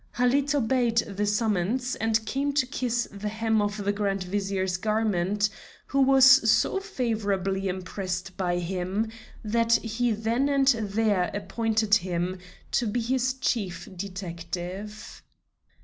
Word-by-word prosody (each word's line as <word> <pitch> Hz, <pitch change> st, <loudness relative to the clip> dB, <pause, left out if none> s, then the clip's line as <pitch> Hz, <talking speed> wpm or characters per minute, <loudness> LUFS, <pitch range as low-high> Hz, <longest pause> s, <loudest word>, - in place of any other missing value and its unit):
Halid 270 Hz, +4 st, +2 dB
obeyed 240 Hz, -3 st, +1 dB
the 205 Hz, -2 st, 0 dB
summons, 215 Hz, +4 st, 0 dB
and 225 Hz, 0 st, 0 dB
came 275 Hz, +5 st, -1 dB
to 280 Hz, -2 st, +2 dB
kiss 245 Hz, -3 st, -1 dB
the 205 Hz, +1 st, -4 dB
hem 220 Hz, 0 st, +1 dB
of 205 Hz, 0 st, -2 dB
the 205 Hz, -, +2 dB
Grand 200 Hz, -2 st, -1 dB
Vizier's 190 Hz, -1 st, -1 dB
garment, 210 Hz, -1 st, +1 dB, 0.4 s
who 275 Hz, -, +1 dB
was 265 Hz, -1 st, +6 dB, 0.2 s
so 220 Hz, -, +3 dB
favorably 205 Hz, -, -1 dB
impressed 185 Hz, 0 st, -4 dB
by 175 Hz, -2 st, 0 dB
him 185 Hz, +5 st, -2 dB, 0.3 s
that 230 Hz, +1 st, +2 dB
he 230 Hz, +1 st, 0 dB
then 225 Hz, +6 st, 0 dB
and 275 Hz, -1 st, +3 dB
there 215 Hz, -5 st, +1 dB
appointed 220 Hz, +1 st, -1 dB
him 180 Hz, -1 st, +1 dB, 0.3 s
to 240 Hz, -, +1 dB
be 215 Hz, +4 st, -1 dB
his 255 Hz, +2 st, 0 dB
Chief 220 Hz, -7 st, -2 dB
Detective. 185 Hz, +2 st, -6 dB
215 Hz, 130 wpm, -26 LUFS, 195-240 Hz, 0.4 s, was